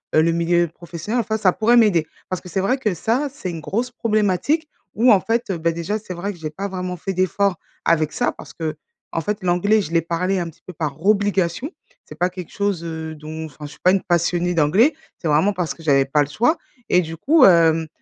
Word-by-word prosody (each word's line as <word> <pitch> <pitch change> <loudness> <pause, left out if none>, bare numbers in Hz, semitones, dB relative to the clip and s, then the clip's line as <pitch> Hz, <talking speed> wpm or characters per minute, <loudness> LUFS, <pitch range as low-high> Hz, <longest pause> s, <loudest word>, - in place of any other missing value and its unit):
heu 155 - +6
le 165 +1 +3
milieu 170 +1 +2
professionnel 170 +7 -5
enfin 220 -2 -1
ça 195 -4 +3
pourrait 230 +5 +3
m'aider. 190 -9 +4 0.2
Parce 185 - -3
que 180 - -11
c'est 190 - -1
vrai 250 +8 +1
que 220 -7 -1
ça, 230 - 0
c'est 240 -10 -5
une 170 -2 -5
grosse 235 +10 -2
problématique, 225 - 0 0.3
où 240 +4 +5
en 200 - +6
fait, 230 +4 -1
heu, 190 - -1
bah, 165 +1 +1
déjà, 170 +6 -2
c'est 200 -3 -8
vrai 185 +4 -4
que 175 - -16
j'ai 155 -1 -4
pas 195 +6 -5
vraiment 180 -1 -4
fait 190 +3 -4
d'effort 185 +1 +1 0.3
avec 155 -2 +2
ça, - - +1
parce - - -12
qu'en 160 0 -6
fait, 205 +3 -3
l'anglais 185 +5 +3
je 165 - -6
l'ai 165 0 +3
parlé 180 +4 -1
un 170 -1 -3
petit 160 - -19
peu - - -8
par 155 -2 -4
obligation. 205 - +1 0.4
C'est 150 - -11
pas 180 +1 +2
quelque 180 -2 -9
chose, 200 -4 -1
heu, 160 -1 -5
dont 155 +1 -7
enfin, 150 -1 -10
je 145 - -9
suis - - -15
pas 185 - +6
une 195 0 +2
passionnée 175 0 +1
d'anglais. 180 - +4 0.3
C'est 170 - -2
vraiment 155 +7 +3
parce 180 -4 -2
que 165 - -15
j'avais 135 -3 +4
pas 145 +2 +2
le 145 - -7
choix. 245 - +2 0.3
Et 180 - +4
du 165 -1 -6
coup, 295 - +4
hem, 165 -3 +5
180 Hz, 235 wpm, -21 LUFS, 165-205 Hz, 0.4 s, heu